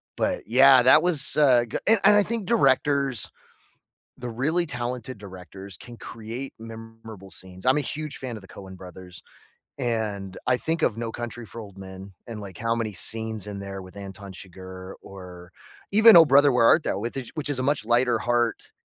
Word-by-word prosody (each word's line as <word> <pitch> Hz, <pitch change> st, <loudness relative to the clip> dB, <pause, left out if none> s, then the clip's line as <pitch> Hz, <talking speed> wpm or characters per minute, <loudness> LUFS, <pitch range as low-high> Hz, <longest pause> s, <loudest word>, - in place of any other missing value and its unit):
But, -, -, -2 dB
yeah, 130 Hz, +2 st, +6 dB
that 125 Hz, -, +6 dB
was, 155 Hz, -6 st, +3 dB
uh, 125 Hz, -5 st, +4 dB
g 115 Hz, -, -4 dB
and 225 Hz, -1 st, +5 dB
and 210 Hz, -, +7 dB
I 205 Hz, -, +5 dB
think 230 Hz, -2 st, -4 dB
directors, 140 Hz, -, +1 dB, 0.9 s
the 125 Hz, -, -6 dB
really 150 Hz, +9 st, -1 dB
talented 125 Hz, -1 st, -4 dB
directors, 95 Hz, -1 st, -10 dB
can 120 Hz, -1 st, -12 dB
create 115 Hz, +5 st, -8 dB
memorable 115 Hz, -3 st, -11 dB
scenes. 95 Hz, +1 st, -6 dB
I'm 130 Hz, +3 st, +4 dB
a -, -, +1 dB
huge 150 Hz, 0 st, -5 dB
fan 125 Hz, -3 st, -6 dB
of 110 Hz, -, -10 dB
the -, -, -14 dB
Coen 95 Hz, -1 st, -11 dB
brothers, 90 Hz, -1 st, -11 dB, 0.5 s
and 105 Hz, -5 st, -3 dB
I 125 Hz, -1 st, +3 dB
think 160 Hz, +5 st, -3 dB
of 110 Hz, -, +1 dB
No 115 Hz, -1 st, -4 dB
Country 120 Hz, 0 st, -7 dB
for 115 Hz, -, -10 dB
Old 100 Hz, -3 st, -13 dB
Men 95 Hz, 0 st, -11 dB
and, 115 Hz, -2 st, -7 dB
like, 95 Hz, -4 st, -10 dB
how 115 Hz, 0 st, -1 dB
many 115 Hz, -2 st, -3 dB
scenes 110 Hz, +4 st, +1 dB
in 100 Hz, -1 st, -6 dB
there 100 Hz, -1 st, -7 dB
with 95 Hz, +1 st, -14 dB
Anton 100 Hz, 0 st, -9 dB
Chigurh, 95 Hz, 0 st, -10 dB
or 90 Hz, -2 st, -12 dB, 0.4 s
even 220 Hz, +2 st, +7 dB
Oh 165 Hz, -, +9 dB
Brother, 145 Hz, 0 st, +5 dB
Where 125 Hz, -2 st, +3 dB
Art 155 Hz, -, +5 dB
Thou? -, -, -2 dB
with 120 Hz, +5 st, -5 dB
ish 130 Hz, -3 st, -6 dB
which 150 Hz, -2 st, -3 dB
is 140 Hz, -3 st, -1 dB
a 130 Hz, -, -1 dB
much 145 Hz, +1 st, 0 dB
lighter 120 Hz, 0 st, +2 dB
heart 120 Hz, -2 st, -1 dB
115 Hz, 195 wpm, -24 LUFS, 100-135 Hz, 0.9 s, Oh